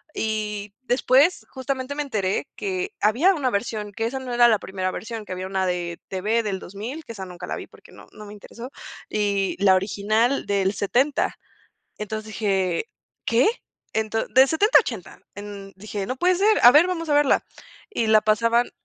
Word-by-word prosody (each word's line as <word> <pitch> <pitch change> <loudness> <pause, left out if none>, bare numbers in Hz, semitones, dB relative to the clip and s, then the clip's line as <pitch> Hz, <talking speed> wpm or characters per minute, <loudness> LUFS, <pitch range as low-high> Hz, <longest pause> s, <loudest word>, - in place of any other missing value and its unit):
Y, 210 -2 -3
después, 260 +6 +3
justamente, 260 0 -4
me 295 - -1
enteré, 205 -8 -1
que 380 0 -3
había 275 - +4
una 275 -5 0
versión, 210 0 -3
que 225 +3 -3
esa 260 +4 -3
no 255 -2 -6
era 240 0 +6
la 220 -3 +3
primera 185 0 -3
versión, 225 0 -6
que 185 - -6
había 185 +1 -5
una 190 0 -1
de 175 -1 -3
TV 210 +5 0
del 200 -3 -3
2000, 225 - -7
que - - -8
esa 195 -3 -7
nunca 180 -1 -9
la - - -3
vi, - - -8
porque - - -19
no - - -15
no 210 - -11
me 205 - -10
interesó, 230 +5 -10 0.4
y 200 -2 0
la 190 -2 +6
original 215 +6 +1
del 195 -1 +1
70. 250 +9 0 0.6
Entonces, 215 +1 -5
dije: 195 -4 -1 0.4
"¿Qué?, 235 +2 +3 0.5
ento 220 0 -1
de 260 +2 +5
70 405 - +4
a - - +2
80". 225 - -7 0.2
En 200 -1 -9
dije: 205 0 -5
"No 255 - -2
puede 360 +5 +3
ser. 420 +4 +3
A 240 - +10
ver, 310 +7 +6
vamos 330 -3 -3
a - - +3
verla". 290 -2 +3 0.5
Y 230 - -1
la 215 0 +5
pasaban 230 +3 +2
220 Hz, 190 wpm, -23 LUFS, 200-260 Hz, 0.6 s, A